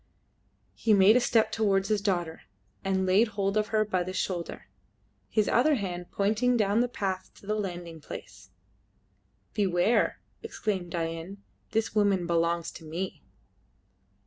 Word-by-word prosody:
He 220 -2 +3
made 200 +3 +6
a - - +6
step 230 -2 +2
towards 195 -3 +1
his 210 -2 +1
daughter 175 -5 -1 0.4
and 190 -1 +1
laid 195 +5 +4
hold 200 -1 -1
of 215 0 +1
her 215 0 +1
by 190 -3 0
the 185 +1 -4
shoulder, 180 -2 -3 0.6
his 215 -2 +1
other 290 +5 +4
hand 180 -6 -4
pointing 220 +5 +1
down 210 0 +2
the 245 - +3
path 195 -6 -3
to - - -17
the 210 - -1
landing 175 -6 -5
place. - - -10 1.0
"Beware!" 195 +2 +2 0.2
exclaimed 190 -5 -3
Dain; 165 +4 -4 0.3
"this 225 0 -1
woman 200 -4 +2
belongs 170 0 0
to - - -12
me!" 170 +4 -5
195 Hz, 145 wpm, -28 LUFS, 175-215 Hz, 1.0 s, made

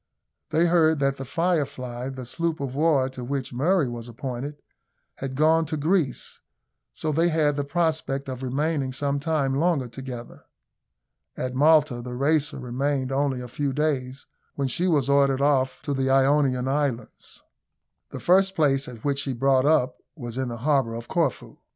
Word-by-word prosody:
They 165 +2 +3
heard 165 -2 +4
that 140 -1 0
the 135 - -6
Firefly, 135 -6 -2
the 130 -2 -7
sloop 165 +5 -2
of 135 -2 -4
war 145 -2 +2
to 130 -1 -8
which 135 0 -4
Murray 155 +4 +2
was 120 -1 -6
appointed, 135 +3 -6 0.6
had 135 -1 -5
gone 160 +2 +3
to 155 - -3
Greece, 155 -3 -1 0.5
so 155 - -3
they 165 +3 +2
had 155 -3 +2
the 145 - -1
prospect 150 -3 -1
of 130 -1 -5
remaining 135 +1 -1
some 140 +1 -1
time 145 -3 0
longer 145 -2 +1
together. 120 -1 -8 1.0
At 130 0 -3
Malta 145 -2 +4
the 125 0 -6
Racer 145 +2 +1
remained 130 +1 -2
only 135 -2 0
a 125 - -7
few 140 +3 -2
days, 135 -3 -2 0.3
when 140 -1 -1
she 170 +8 0
was 145 -7 +2
ordered 140 -1 +3
off 140 -2 +1
to 145 - -2
the 135 -1 0
Ionian 135 -1 +3
Islands. 135 -3 -3 0.7
The - - -7
first 190 +2 +3
place 140 -4 +2
at 120 -3 -10
which 140 -1 +1
she 140 -2 -2
brought 135 +2 +2
up 130 -5 +2 0.2
was 120 -6 -7
in 130 0 -2
the 120 - -5
harbour 135 -7 +2
of 115 0 -7
Corfu. - - -1
140 Hz, 170 wpm, -25 LUFS, 130-150 Hz, 1.0 s, heard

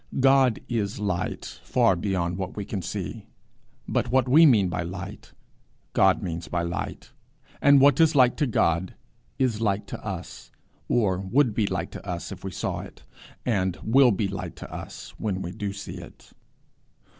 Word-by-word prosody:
God 135 -3 +4
is 105 -4 -2
light 100 -4 -2 0.2
far 115 -6 +3
beyond 90 -2 -1
what 95 -1 -4
we 100 - -3
can 100 -2 -4
see, - - -5 0.6
but - - 0
what 130 -1 +3
we 155 +6 +7
mean 105 -8 +5
by 90 0 -2
light, 90 +2 -7 0.6
God 95 0 +4
means 85 -2 -4
by 85 -1 -1
light; 85 0 -5 0.5
and 140 -1 +7
what 140 0 +5
is 160 -1 +4
light 125 -3 +5
to 150 - +1
God 85 -5 +1 0.4
is 120 -5 0
light 100 -2 0
to - - -8
us, - - -7 0.4
or 100 -6 +2
would 115 +6 +2
be 105 -1 +1
light 90 -2 -3
to - - -9
us 90 -2 -5
if 95 -2 -9
we 95 - -3
saw 90 - -3
it, - - -11 0.4
and 95 -7 0
will 130 +3 +5
be 100 -2 0
light 95 -1 -6
to - - -10
us - - -8
when 95 -3 -2
we 90 - -5
do 100 0 -4
see 100 +1 -7
it. - - -14
100 Hz, 175 wpm, -26 LUFS, 95-125 Hz, 0.6 s, we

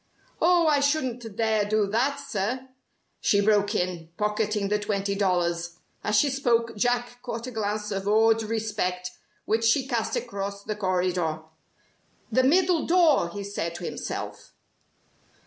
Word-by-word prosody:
"Oh! 345 0 +4
I 300 -2 +4
shouldn't 255 -7 -1
dare 220 -1 +2
do 210 0 +1
that, 240 +8 +1
sir!" 255 0 -3 0.5
she 200 - +3
broke 205 0 +2
in, 175 -2 -2
pocketing 210 -1 0
the 210 0 +1
twenty 200 -1 -1
dollars. 175 -3 0 0.3
As 210 - 0
she 280 +6 +4
spoke, 235 -4 +1
Jack 245 +2 -1
caught 235 -1 -5
a 255 - -6
glance 210 -1 -2
of 195 0 -3
awed 225 +2 +4
respect 210 -5 -2 0.3
which 225 +1 +1
she 230 +4 +3
cast 235 -4 -1
across 200 -3 -4
the 215 - -3
corridor. 180 -5 0 0.9
"The 260 - +4
middle 335 +5 +3
door," 330 - +4
he 200 +3 -6
said 185 -4 -4
to 175 - -7
himself. - - -6
215 Hz, 145 wpm, -26 LUFS, 200-245 Hz, 0.9 s, Oh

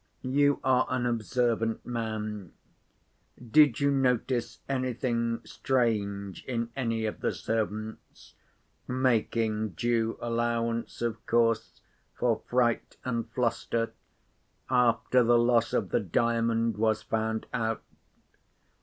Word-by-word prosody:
You 145 +2 +2
are 130 -1 +3
an 130 -1 0
observant 115 -1 0
man—did 110 - -2
you 140 0 +3
notice 125 -2 0
anything 120 -3 -1
strange 105 -5 -1
in 115 -2 -2
any 115 -4 -1
of 110 - -3
the - - 0
servants 110 -1 -4 0.5
(making 115 -4 0
due 115 -1 0
allowance, 115 0 -1
of 115 -2 -2
course, 115 -1 +1 0.3
for 120 -3 +1
fright 120 -2 +1
and 115 -2 -2
fluster), 115 -1 -1 0.8
after 125 0 +3
the 120 +1 +5
loss 120 -1 +3
of 95 - 0
the - - +3
Diamond 115 +3 +1
was 110 0 +1
found 110 0 -1
out? 115 -1 -1
115 Hz, 100 wpm, -28 LUFS, 110-125 Hz, 0.8 s, the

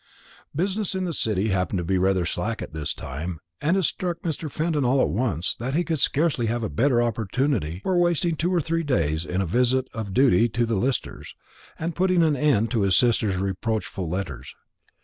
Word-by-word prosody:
Business 195 +4 -1
in 190 -1 -1
the 170 - -2
City 110 -5 0
happened 95 0 0
to 90 - -1
be 95 +2 +1
rather 95 -1 +2
slack 105 +6 -2
at - - -9
this 75 -2 -3
time; 80 +5 -5 0.2
and 165 +6 +2
it 190 - +1
struck 175 +1 -1
Mr. 160 -2 -3
Fenton 155 +1 -1
all 130 +2 +3
at - - +3
once 95 - -1
that 130 +4 -4
he 175 - +2
could 165 -3 -2
scarcely 145 -4 +1
have 115 +1 -1
a 110 - -2
better 120 - +2
opportunity 115 - -1
for 190 - 0
wasting 175 -1 +2
two 170 +4 0
or 180 - +2
three 165 +1 -1
days 85 - 0
in 90 +2 -1
a - - 0
visit 125 +7 +2
of 110 -3 -5
duty 120 -1 +4
to 120 +2 0
the 115 - -2
Listers, 120 +4 -2 0.4
and 165 0 -3
putting 185 -1 +3
an 155 -2 +3
end 125 -6 +2
to 115 -4 +1
his 95 -2 +3
sister's 110 -5 +2
reproachful 95 -1 -2
letters. 95 +2 -5
120 Hz, 205 wpm, -24 LUFS, 95-155 Hz, 0.4 s, duty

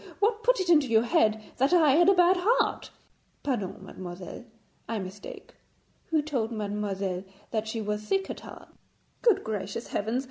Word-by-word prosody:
What 430 +1 +1
put - - +3
it 375 - -1
into 305 -5 +5
your 225 -1 +4
head 220 -2 +2
that 270 +6 +2
I 320 -5 +6
had 345 +6 +5
a 390 - +5
bad 355 +1 +5
heart?' 460 +7 +1 0.5
'Pardon! 200 -8 -3
mademoiselle; 180 +5 -8 0.4
I 230 - -1
mistake. 195 +1 -8 0.5
Who 315 -3 +1
told 250 -7 -2
mademoiselle 200 -3 -2 0.3
that 220 -1 -1
she 225 0 -3
was 210 0 -2
sick 385 - 0
at - - -7
heart?' - - -12 0.5
'Good 460 -5 +4
gracious 210 +1 -4
heavens! 225 +5 -1
230 Hz, 165 wpm, -28 LUFS, 205-345 Hz, 0.5 s, I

